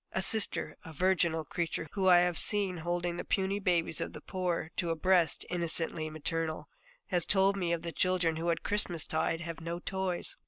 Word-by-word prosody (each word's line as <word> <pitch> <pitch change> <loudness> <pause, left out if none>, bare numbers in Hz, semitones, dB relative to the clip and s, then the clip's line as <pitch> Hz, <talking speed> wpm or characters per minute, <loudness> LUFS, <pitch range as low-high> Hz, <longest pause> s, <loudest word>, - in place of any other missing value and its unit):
A 190 - +1
Sister, 220 +2 +1
a 160 - -9
virginal 170 -2 +1
creature 165 0 -3
whom 195 -2 0
I 175 -1 +7
have 175 -2 +1
seen 200 -4 +1
holding 175 +1 -2
the - - -3
puny 195 +1 0
babies 170 -5 +1
of - - -4
the - - -8
poor 180 -3 -3
to 170 - 0
a 165 - 0
breast 175 0 +2
innocently 165 -2 -1
maternal, 155 0 -3 0.4
has 175 -2 +1
told 195 +2 +4
me 180 -3 -1
of 170 -1 -1
the 170 - -3
children 180 -2 +1
who 170 +1 -1
at 165 - 0
Christmastide 165 -4 0
have 165 -1 -6
no 170 +1 -4
toys. 190 0 -2
175 Hz, 190 wpm, -31 LUFS, 165-185 Hz, 0.4 s, I